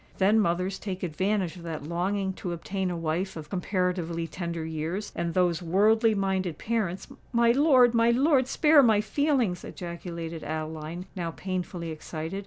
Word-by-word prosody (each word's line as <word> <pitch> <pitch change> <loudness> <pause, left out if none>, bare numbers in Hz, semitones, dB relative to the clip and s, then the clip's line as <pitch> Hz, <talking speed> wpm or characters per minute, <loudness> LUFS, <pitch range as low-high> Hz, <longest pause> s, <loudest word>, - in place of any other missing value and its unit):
Then 205 +3 +4
mothers 180 0 0
take 190 -2 -5
advantage 185 +2 -1
of - - -10
that 165 -3 -5
longing 190 +4 -1
to 180 -1 -5
obtain 190 +2 -3
a 175 - -3
wife 165 +4 -2
of 150 -2 -9
comparatively 180 -3 -1
tender 170 -1 -4
years; 160 +6 -3
and 170 0 -2
those 180 -3 +2
worldly 215 +6 +3
minded 190 -4 -1
parents——" 215 -5 -2 0.2
"My 235 -1 +4
lord—my 245 -4 +5
lord, 265 +1 +3
spare 300 +1 +5
my 220 -5 +4
feelings!" 240 - 0
ejaculated 170 -2 -6
Adeline, 155 +2 -5
now 175 -3 -2
painfully 180 -1 -4
excited. 160 +3 -5
185 Hz, 150 wpm, -27 LUFS, 170-210 Hz, 0.2 s, lord—my